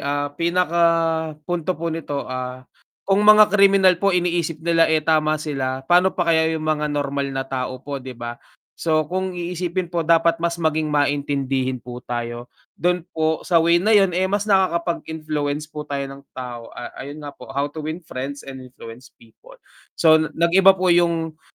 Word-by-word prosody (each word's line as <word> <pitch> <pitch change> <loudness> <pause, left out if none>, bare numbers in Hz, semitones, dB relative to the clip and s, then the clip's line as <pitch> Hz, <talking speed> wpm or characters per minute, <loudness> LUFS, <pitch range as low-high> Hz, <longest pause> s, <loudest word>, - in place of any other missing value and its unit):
ah, 145 0 -2
pinaka 170 +2 0 0.6
punto 175 +1 -2
po 165 0 -3
nito, 145 -4 -4
ah, 130 0 -6 0.4
kung 195 +1 +2
mga 215 0 +7
kriminal 195 -2 +5
po 200 - +3
iniisip 175 -3 0
nila, 165 -1 +3
eh, 155 -1 +1
tama 155 -1 +2
sila, 135 -3 -3
pa'no 180 +4 +3
pa 170 -2 +2
kaya 160 0 +3
yung 155 - -5
mga 150 -1 0
normal 140 -1 -2
na 135 0 -3
tao 130 -1 -4
po 140 -1 -5
'di 130 -1 -9
ba? 120 0 -7 0.4
So 155 -2 0
kung 185 +2 -2
iisipin 175 0 -3
po 170 -1 -2
dapat 165 0 +3
mas 170 0 -2
maging 155 -1 0
maintindihin 140 -3 0
po 125 0 -9
tayo, 120 0 -5 0.2
dun 175 0 -1
po 160 -2 -1
sa 175 - 0
way 170 +1 +4
na 200 - -1
yun, 195 -3 +4
eh, 185 +2 0
mas 205 +1 0
nakakapag-influence 160 -6 -1
po 150 0 -7
tayo 140 -1 -2
ng 135 0 -10
tao, 120 -2 -7
ah, - - -7
ayun 145 +2 -8
nga 145 - -7
po, - - -14
"How 140 +1 -2
to 155 - -6
win 160 +3 -6
friends 140 +2 -6
and 135 -1 -9
influence 125 -1 -12
people." 115 -1 -19 0.4
So, 160 -1 +5 0.2
nag-iba 190 +3 +5
po 185 -1 +2
yung, 165 -2 +1
155 Hz, 180 wpm, -21 LUFS, 140-175 Hz, 0.6 s, mga